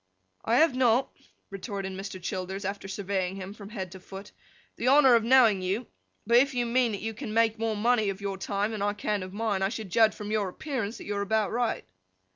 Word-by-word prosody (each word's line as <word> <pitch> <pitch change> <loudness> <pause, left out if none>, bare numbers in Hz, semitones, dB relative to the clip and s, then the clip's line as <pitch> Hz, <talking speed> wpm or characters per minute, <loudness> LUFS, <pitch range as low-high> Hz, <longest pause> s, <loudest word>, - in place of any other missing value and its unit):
'I 230 - +2
have 310 0 +4
not,' 255 0 +3 0.4
retorted 195 -1 -5
Mr. 195 0 -6
Childers, 190 +2 -4
after 195 0 -4
surveying 190 -1 -2
him 195 0 -7
from 205 -2 -11
head 190 -5 -6
to 190 - -10
foot, 195 +2 -10 0.4
'the 240 - -3
honour 270 -1 +7
of 230 -1 +4
knowing 230 -5 +5
you,—but 215 +3 -2
if 270 +1 +3
you 245 -1 +1
mean 240 0 +2
that 200 - -4
you 225 +1 -3
can 215 0 -6
make 225 -1 +3
more 225 -1 0
money 220 -1 +2
of 195 0 -4
your 200 -2 -4
time 205 +2 -1
than 215 -2 -4
I 205 0 +1
can 205 0 -2
of 185 0 -7
mine, 205 -1 -1
I 195 - +2
should 215 -4 -6
judge 220 +2 +4
from 210 0 -6
your 210 -3 0
appearance, 240 -1 -4
that - - -10
you 205 - -3
are - - -1
about 215 +1 0
right. 235 -1 -1
210 Hz, 225 wpm, -28 LUFS, 195-230 Hz, 0.4 s, honour